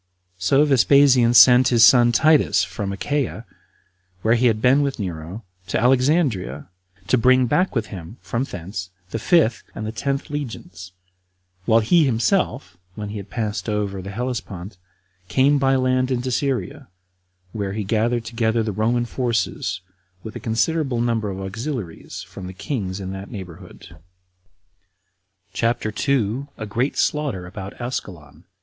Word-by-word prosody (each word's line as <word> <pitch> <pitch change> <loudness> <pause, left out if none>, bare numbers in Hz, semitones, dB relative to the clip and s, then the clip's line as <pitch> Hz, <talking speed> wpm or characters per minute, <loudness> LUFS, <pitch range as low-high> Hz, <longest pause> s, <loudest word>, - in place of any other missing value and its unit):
So 140 +8 +3
Vespasian 135 -3 +5
sent 125 +2 +8
his 120 -2 +4
son 120 -1 +6
Titus 155 +5 +4
from 100 -3 -4
Achaia, 140 +7 -2 0.8
where 110 - +4
he 120 +1 +3
had 110 -2 +1
been 130 +5 +4
with 140 -1 -1
Nero, 90 +1 -6 0.2
to - - -1
Alexandria, 125 - +1 0.4
to 130 - +3
bring 130 +2 +4
back 180 +7 +1
with 115 -2 0
him 90 +4 -9
from 120 +1 -3
thence 95 -4 -6 0.2
the 115 - -3
fifth 120 - +2
and 110 - -5
the 110 - -3
tenth 140 +5 -3
legions, 100 -10 -6 0.7
while 115 0 +4
he 165 +9 +4
himself, 130 - 0 0.2
when 105 -1 -6
he 105 - -6
had 100 -1 -8
passed 105 -3 -3
over 100 -2 -2
the 95 - -8
Hellespont, 105 -4 -5 0.5
came 140 +6 +3
by 135 -1 +3
land 130 0 +1
into 130 0 -1
Syria, 140 +1 -2 0.6
where 100 -2 -4
he 105 0 -3
gathered 115 +3 0
together 115 0 0
the 110 - -2
Roman 115 +4 0
forces, 115 -7 -2 0.4
with 110 - -8
a - - -5
considerable 130 +3 0
number 115 -3 0
of 95 -1 -5
auxiliaries 100 - -6
from 95 -2 -10
the 95 - -8
kings 95 -3 -4
in 95 -1 -5
that 95 +1 -7
neighborhood. 90 -5 -10 1.6
CHAPTER 115 +1 0
2. 130 +2 -1
A 110 - -5
Great 120 +7 -2
Slaughter 145 -12 -1
About 95 +1 -9
Ascalon. 95 - -7
115 Hz, 145 wpm, -22 LUFS, 100-130 Hz, 1.6 s, sent